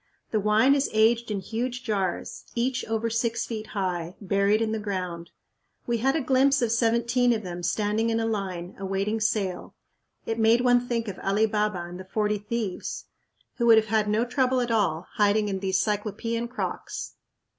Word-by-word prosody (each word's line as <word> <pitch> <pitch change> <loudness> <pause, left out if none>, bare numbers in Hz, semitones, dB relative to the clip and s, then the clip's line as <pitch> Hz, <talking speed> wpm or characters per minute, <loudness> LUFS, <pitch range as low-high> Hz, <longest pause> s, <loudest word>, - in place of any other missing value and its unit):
The 215 - +2
wine 215 +6 +4
is 280 0 +1
aged 225 +2 +3
in 205 -2 -2
huge 245 +4 -3
jars, 195 -5 -2
each 255 +2 0
over 225 +1 -1
six 230 0 -1
feet 220 -2 -5
high, 180 -3 -3
buried 200 +1 +2
in 225 -1 0
the 220 - -1
ground. 180 -5 -4 0.6
We 235 -1 0
had 270 +5 +2
a 320 - +1
glimpse 270 +1 +3
of 230 - +1
seventeen 235 +1 +2
of 220 -2 -3
them 175 -1 -6
standing 210 +5 0
in 225 0 +1
a 225 - 0
line, 190 -5 -3
awaiting 195 +3 -1
sale. 210 -4 -1 0.5
It 225 0 -2
made 225 +2 +4
one 245 0 +3
think 230 -2 -1
of 195 - -6
Ali 200 +3 +2
Baba 210 -4 -1
and 175 +1 -9
the 185 - -8
Forty 210 +2 0
Thieves, 210 -2 -4 0.5
who 235 - +1
would 225 -1 +8
have 220 -1 +2
had 215 -1 +2
no 220 +3 +2
trouble 255 0 +1
at 240 -1 -1
all 190 -6 +1
hiding 210 0 +3
in 190 -1 -2
these 190 -1 0
Cyclopean 215 +3 -1
crocks. 245 - -5
220 Hz, 185 wpm, -26 LUFS, 200-235 Hz, 0.6 s, would